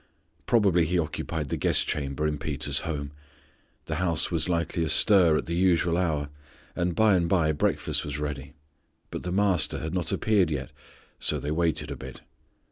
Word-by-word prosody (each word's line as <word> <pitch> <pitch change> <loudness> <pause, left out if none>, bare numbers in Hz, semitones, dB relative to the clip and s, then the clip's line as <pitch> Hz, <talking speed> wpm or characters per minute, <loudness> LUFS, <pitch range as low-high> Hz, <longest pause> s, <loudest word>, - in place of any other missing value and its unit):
Probably 100 -8 +3
He 90 +3 0
occupied 80 -2 -3
the - - -2
guest - - +1
chamber 70 0 -2
in 75 -1 -1
Peter's 75 -1 0
home. 70 -2 -4 0.7
The 80 - -3
house 85 -2 0
was 85 0 0
likely 85 0 -1
astir 85 0 +5
at - - -3
the 85 - -4
usual 85 -1 +2
hour, 80 -5 -1 0.5
and 90 -1 -1
by 110 -2 +4
and 85 -2 +1
by 85 -5 +2
breakfast 75 - -1
was 75 0 -5
ready, 75 -1 -5 0.6
but - - -5
the 90 - -5
Master 95 -4 +2
had 80 +2 -5
not 90 -2 -1
appeared 100 -6 +2
yet, 70 -4 -4 0.5
so - - +2
they 75 - -4
waited 80 0 0
a - - -4
bit. - - -10
80 Hz, 175 wpm, -26 LUFS, 75-90 Hz, 0.7 s, astir